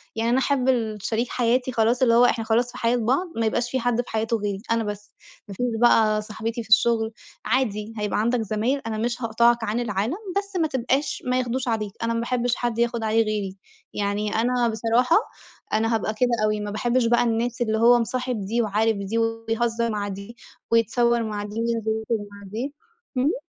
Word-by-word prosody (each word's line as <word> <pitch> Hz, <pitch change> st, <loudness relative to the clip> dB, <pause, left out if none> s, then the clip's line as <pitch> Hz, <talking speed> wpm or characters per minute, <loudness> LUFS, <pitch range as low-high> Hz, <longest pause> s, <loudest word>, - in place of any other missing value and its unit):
يعني 225 Hz, +1 st, 0 dB
أنا 255 Hz, -, +3 dB
أحب 265 Hz, -1 st, +1 dB
ال 225 Hz, -4 st, 0 dB
شريك 230 Hz, +4 st, -1 dB
حياتي 250 Hz, +1 st, +1 dB
خلاص 235 Hz, +2 st, +1 dB
اللي 240 Hz, -3 st, +5 dB
هو 240 Hz, +1 st, +6 dB
إحنا 230 Hz, -2 st, +1 dB
خلاص 235 Hz, +2 st, +1 dB
في -, -, -10 dB
حياة 235 Hz, +1 st, +1 dB
بعض، 255 Hz, +10 st, +1 dB
ما 230 Hz, -, 0 dB
يبقاش 240 Hz, +2 st, 0 dB
فيه 260 Hz, -, 0 dB
حد 245 Hz, -1 st, 0 dB
في 245 Hz, -, -13 dB
حياتُه 225 Hz, +1 st, 0 dB
غيري 200 Hz, -2 st, -3 dB
أنا 230 Hz, 0 st, +2 dB
بس، 205 Hz, -1 st, -6 dB, 0.3 s
ما 200 Hz, -, -7 dB
فيش 245 Hz, -, -1 dB, 0.2 s
بقى 215 Hz, -3 st, +4 dB
صاحبتي 225 Hz, +2 st, -4 dB
في 220 Hz, -, -18 dB
الشغل 220 Hz, +1 st, +4 dB, 0.3 s
عادي 225 Hz, -4 st, 0 dB
هيبقى 210 Hz, -1 st, -1 dB
عندك 235 Hz, +2 st, +1 dB
زمايل 220 Hz, +6 st, -1 dB
أنا 220 Hz, -, -3 dB
مش 240 Hz, +3 st, -2 dB
هاقطعك 235 Hz, +1 st, +3 dB
عن 220 Hz, +2 st, -1 dB
العالم، 225 Hz, -, -1 dB, 0.2 s
بس 400 Hz, -1 st, -3 dB
ما 325 Hz, -2 st, +2 dB
تبقاش 270 Hz, +1 st, -1 dB
ما 250 Hz, 0 st, +1 dB
ياخدوش 255 Hz, +1 st, -2 dB
عليك، 215 Hz, -3 st, -1 dB
أنا 230 Hz, 0 st, 0 dB
ما 230 Hz, -, -1 dB
باحبش 245 Hz, 0 st, 0 dB
حد 240 Hz, -2 st, -2 dB
ياخد 235 Hz, -1 st, 0 dB
عليه 220 Hz, +1 st, +3 dB
غيري، 205 Hz, -3 st, -3 dB, 0.4 s
يعني 205 Hz, +1 st, -1 dB
أنا 240 Hz, +2 st, +2 dB
بصراحة 230 Hz, -, +2 dB, 0.6 s
أنا 225 Hz, +1 st, +2 dB
هابقى 220 Hz, -1 st, -1 dB
كده 245 Hz, +3 st, +1 dB, 0.2 s
أوي، 215 Hz, 0 st, 0 dB
ما 210 Hz, 0 st, -4 dB
باحبش 240 Hz, +3 st, +1 dB
بقى 240 Hz, +1 st, +3 dB
الناس 235 Hz, +1 st, -1 dB
اللي 220 Hz, -2 st, +1 dB
هو 240 Hz, +2 st, +6 dB
مصاحب 245 Hz, -2 st, -2 dB
دي، 230 Hz, +4 st, 0 dB
وعارف 220 Hz, 0 st, +1 dB
دي، 200 Hz, +3 st, -3 dB
ويهزر 225 Hz, +1 st, 0 dB
مع 205 Hz, -1 st, -2 dB
دي، 200 Hz, +4 st, -8 dB, 0.3 s
ويتصور 235 Hz, +1 st, +3 dB
مع 210 Hz, -2 st, -3 dB
دي، 210 Hz, 0 st, -8 dB
وينزل 230 Hz, -1 st, -1 dB, 0.2 s
يخرُج 215 Hz, -3 st, -1 dB
مع 200 Hz, 0 st, -12 dB
دي، 250 Hz, +7 st, -4 dB, 0.4 s
امم. 305 Hz, -, +1 dB
230 Hz, 200 wpm, -24 LUFS, 215-245 Hz, 0.6 s, هو